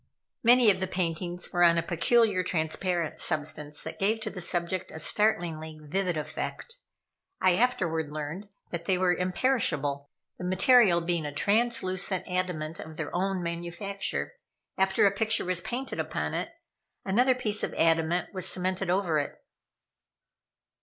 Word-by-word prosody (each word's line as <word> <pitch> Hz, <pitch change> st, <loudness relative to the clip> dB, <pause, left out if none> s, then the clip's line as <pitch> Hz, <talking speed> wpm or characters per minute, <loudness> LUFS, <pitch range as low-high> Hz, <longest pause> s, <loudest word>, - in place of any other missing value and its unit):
Many 240 Hz, -1 st, +6 dB
of 185 Hz, -, -2 dB
the 190 Hz, -, -1 dB
paintings 175 Hz, 0 st, -2 dB
were 175 Hz, -, +1 dB
on 170 Hz, -1 st, +6 dB
a 165 Hz, -, +1 dB
peculiar 195 Hz, +3 st, +2 dB
transparent 170 Hz, -1 st, -1 dB
substance 150 Hz, -2 st, -1 dB
that 160 Hz, -, -7 dB
gave 215 Hz, +3 st, +1 dB
to 215 Hz, -1 st, -3 dB
the 180 Hz, -, -5 dB
subject 175 Hz, +1 st, -1 dB
a -, -, -8 dB
startlingly 160 Hz, -4 st, 0 dB
vivid 175 Hz, +3 st, -2 dB
effect. 465 Hz, -, -5 dB, 0.6 s
I 185 Hz, -, +4 dB
afterward 175 Hz, -9 st, 0 dB
learned 155 Hz, +7 st, -6 dB, 0.2 s
that 170 Hz, -1 st, -5 dB
they 185 Hz, 0 st, +2 dB
were 180 Hz, -1 st, +3 dB
imperishable, 165 Hz, -, 0 dB, 0.3 s
the -, -, -6 dB
material 185 Hz, 0 st, +5 dB
being 170 Hz, -1 st, -1 dB
a -, -, -5 dB
translucent 195 Hz, 0 st, 0 dB
adamant 180 Hz, -4 st, -3 dB
of 155 Hz, 0 st, -9 dB
their -, -, -4 dB
own 190 Hz, 0 st, -1 dB
manufacture. 170 Hz, -, -3 dB, 0.4 s
After 190 Hz, +1 st, +3 dB
a 200 Hz, -, +5 dB
picture 220 Hz, +2 st, 0 dB
was 180 Hz, 0 st, 0 dB
painted 255 Hz, +8 st, -4 dB
upon -, -, -2 dB
it, -, -, -2 dB, 0.6 s
another 245 Hz, +7 st, +3 dB
piece 215 Hz, -4 st, 0 dB
of -, -, -3 dB
adamant 165 Hz, +3 st, +1 dB
was 185 Hz, -1 st, +1 dB
cemented 185 Hz, 0 st, 0 dB
over 180 Hz, -4 st, +1 dB
it. 145 Hz, -, -5 dB
180 Hz, 145 wpm, -28 LUFS, 165-200 Hz, 0.6 s, Many